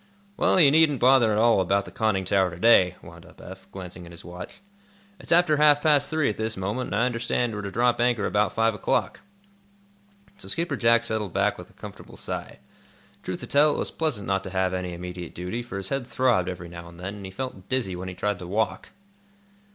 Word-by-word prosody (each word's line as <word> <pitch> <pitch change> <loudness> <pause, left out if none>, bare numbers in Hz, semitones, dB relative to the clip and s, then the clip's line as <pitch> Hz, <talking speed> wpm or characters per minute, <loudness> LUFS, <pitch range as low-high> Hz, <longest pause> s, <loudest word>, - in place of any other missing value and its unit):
'" - - -33
"Well, 190 - +3
you 145 -5 +7
needn't 155 -3 +4
bother 125 -3 +5
at 105 - +1
all 115 -3 +4
about 100 +2 +1
the - - -11
conning 105 -4 0
tower 95 0 +2
to 85 - -10
day," 95 -3 +5
wound - - -13
up - - -18
Eph, 95 +1 -12
glancing 90 -2 -9
at - - -12
his 85 - -12
watch. 90 0 -9 0.6
"It's - - -8
after 165 -3 +5
half 150 -1 +5
past 150 -2 +3
three 155 -2 +1
at 105 - -2
this 110 -1 -3
moment 105 +7 -3
and - - -3
I 115 +4 +2
understand 120 -1 -1
we're 105 - -4
to 100 - -5
drop 120 +3 +1
anchor 120 -4 +1
about 105 +2 +1
five 115 0 +1
o'clock." 105 - -1 1.2
So 190 - -10
Skipper 165 -3 -2
Jack 115 -1 +3
settled 110 -5 -3
back - - +1
with - - -11
a - - -22
comfortable - - -11
sigh. - - -6 0.6
Truth 90 -1 -5
to - - -5
tell, 145 +1 +3
it - - -4
was - - -3
pleasant 150 -11 -1
not 95 0 0
to - - -5
have 95 0 0
any 90 -1 -3
immediate 90 0 -7
duty, 90 +7 -4
for 120 -5 -7
his 95 0 -5
head 135 -3 -3
throbbed, 120 -7 +1
every 90 -1 -7
now 85 0 -10
and 85 0 -15
then, 100 +3 -6
and 100 - -9
he - - -10
felt 100 -3 -7
dizzy 125 -8 -1
when 90 +1 -6
he 90 - -8
tried 105 -1 -2
to 90 - -8
walk. 110 +4 -2
105 Hz, 230 wpm, -25 LUFS, 95-125 Hz, 1.2 s, you